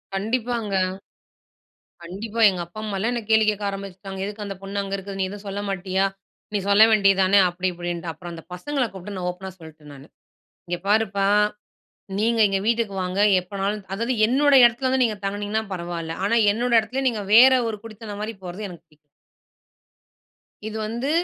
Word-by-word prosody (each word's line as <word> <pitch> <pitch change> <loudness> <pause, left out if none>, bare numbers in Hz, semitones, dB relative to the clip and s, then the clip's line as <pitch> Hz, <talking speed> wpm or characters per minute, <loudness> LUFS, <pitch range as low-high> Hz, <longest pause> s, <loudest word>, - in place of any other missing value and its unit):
கண்டிப்பாங்க. 225 0 -1 1.3
கண்டிப்பா. 205 +6 -6
எங்க 180 -2 -3
அப்பா, 175 +5 -11
அம்மாலா 210 +2 -2
என்ன 240 -1 -2
கேள்வி 220 -1 +5
கேட்க 210 0 -3
ஆரம்பிச்சுட்டாங்க. 195 -1 -7
எதுக்கு 210 +1 -6
அந்த 195 - -5
பொண்ணு 200 +1 -3
அங்க 195 0 -3
இருக்குது. 195 0 -7
நீ 190 - +2
எதுவும் 205 +1 -9
சொல்ல 200 +1 -4
மாட்டியா? 190 0 0 0.5
நீ 205 - +2
சொல்ல 200 +2 +7
வேண்டியது 195 -3 +4
தானே, 195 +2 +4
அப்படி 180 +2 -3
இப்படின்ட்டு. 175 -1 -4
அப்புறம் 175 +2 -9
அந்த 165 - -9
பசங்கள 275 +9 -2
கூப்பிட்டு 195 +1 -8
நான் 180 -1 -2
ஓப்பனா 190 +1 -9
சொல்லிட்டேன் 155 -2 -13
நானு 140 +2 -13 0.6
"இங்க 175 0 -2
பாருப்பா 200 -2 +2 0.9
நீங்க 225 +2 +1
எங்க 195 0 0
வீட்டுக்கு 230 -2 0
வாங்க, 185 +2 -2 0.2
எப்போனாலு 195 +3 -3 0.2
அதாவது 230 +6 -1
என்னோட 285 +5 +3
இடத்துல 240 +2 +3
வந்து 260 0 +1
நீங்க 220 -3 0
தங்கனிங்கனா 205 +2 -2
பரவாயில்ல, 170 -2 -4
ஆனா 220 +3 +2 0.2
என்னோட 240 +3 -1
இடத்துல, 235 +5 -4
நீங்க 215 -4 -3
வேறு 260 +3 +8
ஒரு 220 - -3
குடித்தனம் 215 -2 -8
மாதிரி 220 +1 -4
போறது 185 +4 -6
எனக்கு 175 -2 -12
புடிக்" 150 - -26 1.7
"இது 220 0 -5
வந்து, 235 +5 -3
200 Hz, 165 wpm, -23 LUFS, 185-220 Hz, 1.7 s, வேறு